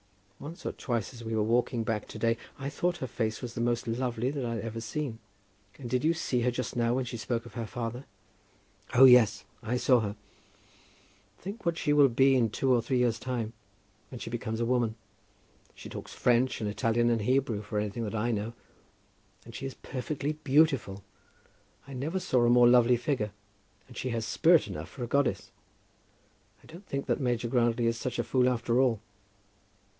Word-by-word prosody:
Once 160 Hz, +4 st, -9 dB
or -, -, -1 dB
twice 120 Hz, -1 st, -3 dB
as 120 Hz, -1 st, -10 dB
we 115 Hz, 0 st, -3 dB
were 110 Hz, -, +2 dB
walking 120 Hz, +1 st, +1 dB
back 110 Hz, -2 st, -2 dB
to -, -, -9 dB
day, 115 Hz, 0 st, +2 dB, 0.2 s
I 135 Hz, -, -5 dB
thought 175 Hz, +4 st, -1 dB
her 130 Hz, -, -4 dB
face 110 Hz, -3 st, -3 dB
was 120 Hz, -1 st, -5 dB
the 115 Hz, -, -3 dB
most 120 Hz, -1 st, 0 dB
lovely 120 Hz, +1 st, -1 dB
that 140 Hz, -2 st, -3 dB
I 115 Hz, -1 st, -2 dB
had 110 Hz, -, -4 dB
ever 115 Hz, 0 st, -5 dB
seen. 115 Hz, +1 st, -4 dB, 0.6 s
And 130 Hz, -, -7 dB
did 125 Hz, +1 st, 0 dB
you 165 Hz, +2 st, +3 dB
see 125 Hz, -6 st, -1 dB
her 125 Hz, -, +2 dB
just 125 Hz, +1 st, -4 dB
now, 120 Hz, +1 st, +1 dB
as 130 Hz, -2 st, -2 dB
she 120 Hz, -, -5 dB
spoke 115 Hz, +1 st, -3 dB
of 120 Hz, -, -12 dB
her 115 Hz, -2 st, -4 dB
father?" 120 Hz, +3 st, -5 dB, 0.9 s
"Oh, 130 Hz, +2 st, +9 dB
yes; 125 Hz, -5 st, +6 dB, 0.2 s
I 120 Hz, +2 st, -1 dB
saw 125 Hz, 0 st, +4 dB
her." 105 Hz, -2 st, -3 dB, 1.2 s
"Think 200 Hz, +4 st, -8 dB
what 170 Hz, -1 st, 0 dB
she 145 Hz, -4 st, +1 dB
will 145 Hz, -2 st, +6 dB
be 135 Hz, +3 st, +4 dB
in 120 Hz, -3 st, +3 dB
two 130 Hz, +4 st, +1 dB
or 120 Hz, -, +3 dB
three 125 Hz, +3 st, -1 dB
years' 120 Hz, -2 st, +1 dB
time, 120 Hz, -3 st, -3 dB, 0.6 s
when 130 Hz, -, -8 dB
she 115 Hz, -, -7 dB
becomes 115 Hz, -2 st, -3 dB
a 120 Hz, -, +1 dB
woman. 120 Hz, -2 st, +1 dB, 0.8 s
She -, -, -10 dB
talks -, -, -8 dB
French, 125 Hz, +1 st, +2 dB
and 110 Hz, -, -2 dB
Italian, 115 Hz, +3 st, +1 dB
and 115 Hz, -2 st, +1 dB
Hebrew 125 Hz, -2 st, +1 dB
for 105 Hz, 0 st, -5 dB
anything 105 Hz, +2 st, -2 dB
that 105 Hz, -, -4 dB
I 115 Hz, +3 st, 0 dB
know; 110 Hz, +1 st, -2 dB, 0.9 s
and 115 Hz, -, -11 dB
she 135 Hz, -, -5 dB
is 135 Hz, -, -8 dB
perfectly 140 Hz, +3 st, -4 dB
beautiful. 140 Hz, -9 st, +2 dB, 0.8 s
I 140 Hz, -, -9 dB
never 150 Hz, +9 st, -2 dB
saw 125 Hz, -8 st, +1 dB
a 120 Hz, -, +4 dB
more 120 Hz, 0 st, +6 dB
lovely 120 Hz, 0 st, +5 dB
figure; 120 Hz, -4 st, -1 dB, 0.6 s
and -, -, -14 dB
she 130 Hz, -, -3 dB
has 115 Hz, -2 st, -2 dB
spirit 165 Hz, +8 st, +4 dB
enough -, -, -6 dB
for 125 Hz, -, -7 dB
a -, -, -3 dB
goddess. 140 Hz, 0 st, 0 dB, 1.1 s
I -, -, -18 dB
don't 175 Hz, +5 st, -13 dB
think 140 Hz, 0 st, -3 dB
that -, -, 0 dB
Major 120 Hz, -2 st, 0 dB
Grantly 120 Hz, -1 st, +1 dB
is 115 Hz, 0 st, 0 dB
such 130 Hz, -, -3 dB
a 120 Hz, -, 0 dB
fool 125 Hz, 0 st, +2 dB
after 120 Hz, 0 st, 0 dB
all." 120 Hz, -5 st, +2 dB
120 Hz, 200 wpm, -29 LUFS, 115-130 Hz, 1.2 s, Oh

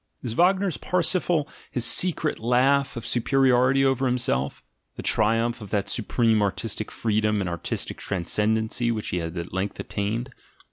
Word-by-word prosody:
Is 120 Hz, -3 st, -3 dB
Wagner's 185 Hz, -, +2 dB
Parsifal 175 Hz, -3 st, +1 dB, 0.2 s
his 120 Hz, -2 st, -1 dB
secret 160 Hz, +2 st, +1 dB
laugh 130 Hz, +3 st, +2 dB
of 115 Hz, -, -6 dB
superiority 130 Hz, +1 st, +3 dB
over 135 Hz, 0 st, +2 dB
himself, 120 Hz, -, -1 dB, 0.3 s
the -, -, -7 dB
triumph 115 Hz, +2 st, +1 dB
of 105 Hz, -, -8 dB
that 100 Hz, -1 st, -1 dB
supreme 115 Hz, -1 st, +1 dB
artistic 105 Hz, +1 st, -2 dB
freedom 105 Hz, -1 st, 0 dB
and 95 Hz, -, -2 dB
artistic 85 Hz, -1 st, -4 dB
transcendency 110 Hz, +5 st, 0 dB
which 110 Hz, -2 st, -3 dB
he 90 Hz, -, -2 dB
has 85 Hz, 0 st, -4 dB
at 85 Hz, +1 st, -6 dB
length 95 Hz, +1 st, -3 dB
attained. 110 Hz, +5 st, -3 dB
115 Hz, 145 wpm, -25 LUFS, 105-135 Hz, 0.3 s, superiority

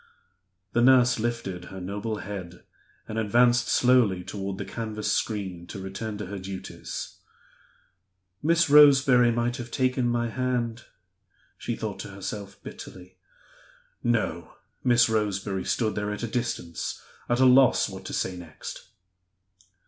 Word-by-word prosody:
The 120 Hz, -, +3 dB
nurse 125 Hz, -1 st, +5 dB
lifted 105 Hz, -6 st, -3 dB
her 95 Hz, -, -9 dB
noble 100 Hz, +4 st, -4 dB
head 95 Hz, -4 st, -7 dB, 0.4 s
and 110 Hz, +1 st, -3 dB
advanced 120 Hz, +3 st, +3 dB
slowly 120 Hz, -8 st, +3 dB
toward 95 Hz, +1 st, -5 dB
the -, -, -5 dB
canvas 110 Hz, -2 st, -3 dB
screen 95 Hz, -5 st, -2 dB
to 100 Hz, -, -7 dB
return 100 Hz, +3 st, -5 dB
to 105 Hz, -, -5 dB
her 100 Hz, +2 st, -6 dB
duties. 95 Hz, 0 st, -7 dB, 1.2 s
"Miss 170 Hz, +2 st, +3 dB
Roseberry 135 Hz, -4 st, +7 dB
might 120 Hz, +2 st, -1 dB
have 120 Hz, -2 st, -7 dB
taken 130 Hz, 0 st, +1 dB
my 120 Hz, 0 st, 0 dB
hand!" 120 Hz, -1 st, -2 dB, 0.7 s
she 120 Hz, -, -4 dB
thought 110 Hz, -3 st, -5 dB
to -, -, -6 dB
herself, 100 Hz, 0 st, -7 dB
bitterly. 90 Hz, 0 st, -11 dB, 0.8 s
No! 105 Hz, -8 st, -1 dB, 0.3 s
Miss 120 Hz, -2 st, +5 dB
Roseberry 100 Hz, -3 st, -1 dB
stood 110 Hz, -3 st, 0 dB
there 105 Hz, 0 st, -2 dB
at 105 Hz, -, -5 dB
a -, -, -1 dB
distance, 110 Hz, -8 st, -3 dB, 0.3 s
at 120 Hz, +1 st, +2 dB
a 130 Hz, -, +6 dB
loss 130 Hz, 0 st, +6 dB
what -, -, -9 dB
to -, -, -6 dB
say 95 Hz, -, -1 dB
next. 85 Hz, -3 st, -9 dB
110 Hz, 135 wpm, -26 LUFS, 100-120 Hz, 1.2 s, Roseberry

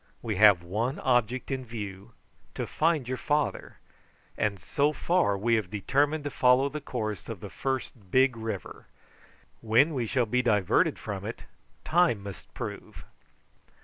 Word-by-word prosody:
We 110 Hz, -4 st, -2 dB
have 100 Hz, -4 st, +6 dB
one 110 Hz, -, -2 dB
object 125 Hz, +1 st, 0 dB
in 130 Hz, -1 st, -2 dB
view 105 Hz, -5 st, -7 dB, 0.4 s
to -, -, -2 dB
find 155 Hz, -5 st, 0 dB
your 130 Hz, 0 st, -3 dB
father, 150 Hz, 0 st, -1 dB, 0.6 s
and 100 Hz, -2 st, -1 dB
so 145 Hz, +1 st, 0 dB
far 170 Hz, -, +1 dB
we 115 Hz, +4 st, +1 dB
have 110 Hz, -5 st, +1 dB
determined 145 Hz, +9 st, 0 dB
to 145 Hz, -, -4 dB
follow 130 Hz, +2 st, +4 dB
the 150 Hz, +1 st, -6 dB
course 110 Hz, -7 st, -4 dB
of 115 Hz, -5 st, -5 dB
the 100 Hz, 0 st, -9 dB
first 125 Hz, -2 st, -4 dB
big 130 Hz, +3 st, +4 dB
river; 110 Hz, 0 st, -6 dB, 0.7 s
when 120 Hz, +8 st, +3 dB
we 125 Hz, -5 st, -1 dB
shall 125 Hz, +1 st, +1 dB
be 125 Hz, +3 st, +1 dB
diverted 105 Hz, -6 st, +2 dB
from -, -, -6 dB
it -, -, -6 dB, 0.4 s
time 165 Hz, -, +2 dB
must 100 Hz, -2 st, -9 dB
prove." -, -, -7 dB
120 Hz, 150 wpm, -28 LUFS, 105-140 Hz, 0.7 s, have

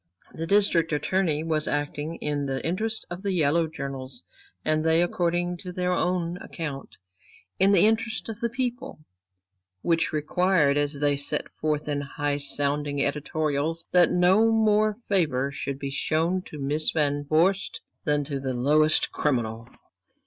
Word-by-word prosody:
The 165 Hz, +1 st, -5 dB
District 185 Hz, -4 st, +3 dB
Attorney 155 Hz, +1 st, 0 dB
was 155 Hz, -2 st, -1 dB
acting 145 Hz, +2 st, -2 dB
in 145 Hz, -1 st, -2 dB
the 135 Hz, -1 st, -3 dB
interests 220 Hz, +6 st, -2 dB
of 175 Hz, +1 st, -5 dB
the 200 Hz, -1 st, -1 dB
yellow 165 Hz, 0 st, +2 dB
journals 135 Hz, -, -6 dB, 0.4 s
and 155 Hz, 0 st, +1 dB
they, 160 Hz, 0 st, +3 dB
according 175 Hz, 0 st, 0 dB
to 180 Hz, +1 st, -8 dB
their 180 Hz, 0 st, -1 dB
own 180 Hz, -1 st, 0 dB
account, 150 Hz, -6 st, -7 dB, 0.6 s
in 195 Hz, +1 st, +5 dB
the 200 Hz, -1 st, +5 dB
interests 225 Hz, 0 st, 0 dB
of 225 Hz, -1 st, -6 dB
the 235 Hz, -1 st, -1 dB
people, 250 Hz, +1 st, -4 dB, 0.9 s
which 165 Hz, -1 st, +1 dB
required, 155 Hz, -1 st, +2 dB
as 145 Hz, 0 st, 0 dB
they 145 Hz, 0 st, +2 dB
set 145 Hz, -, +2 dB
forth 150 Hz, -1 st, -1 dB
in 145 Hz, -1 st, -1 dB
high 145 Hz, +1 st, -2 dB
sounding 145 Hz, 0 st, -1 dB
editorials, 150 Hz, +2 st, -1 dB
that 180 Hz, -1 st, +5 dB
no 190 Hz, +6 st, +4 dB
more 215 Hz, -1 st, +3 dB
favor 145 Hz, -9 st, +1 dB
should 140 Hz, -1 st, -4 dB
be 140 Hz, 0 st, -5 dB
shown 165 Hz, +6 st, 0 dB
to 150 Hz, -, -9 dB
Miss 145 Hz, +2 st, 0 dB
Van 145 Hz, -2 st, 0 dB
Vorst 170 Hz, +6 st, +1 dB, 0.2 s
than 150 Hz, -1 st, +1 dB
to 140 Hz, -1 st, -4 dB
the 130 Hz, -1 st, -3 dB
lowest 155 Hz, +5 st, +3 dB
criminal. 115 Hz, -4 st, -1 dB
155 Hz, 150 wpm, -26 LUFS, 145-180 Hz, 0.9 s, in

